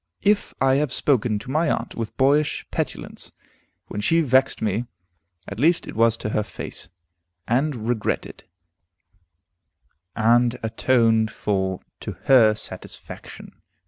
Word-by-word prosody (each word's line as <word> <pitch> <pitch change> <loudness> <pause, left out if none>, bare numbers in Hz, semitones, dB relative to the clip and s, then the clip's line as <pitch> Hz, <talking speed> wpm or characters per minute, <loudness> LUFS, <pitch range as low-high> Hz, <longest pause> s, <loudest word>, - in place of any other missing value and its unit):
If 205 0 +2
I 135 0 +3
have 145 -2 0
spoken 120 -7 +1
to 115 +5 -7
my 155 +2 +1
aunt - - -2
with 115 -2 -5
boyish 145 +3 +2
petulance - - -5 0.5
when 105 - -5
she 165 +10 +3
vexed 130 -2 +2
me, 110 +2 -1 0.6
at 100 - -7
least 165 +5 +3
it - - -7
was 115 0 +3
to 105 - -4
her 105 - 0
face, 105 - -7 0.6
and 125 -2 0
regretted 120 -4 -2 1.7
and 120 +2 +3
atoned 115 -1 +2
for 95 -3 -2 0.2
to - - -6
her 115 -5 +6
satisfaction. - - -10
120 Hz, 125 wpm, -23 LUFS, 110-135 Hz, 1.7 s, her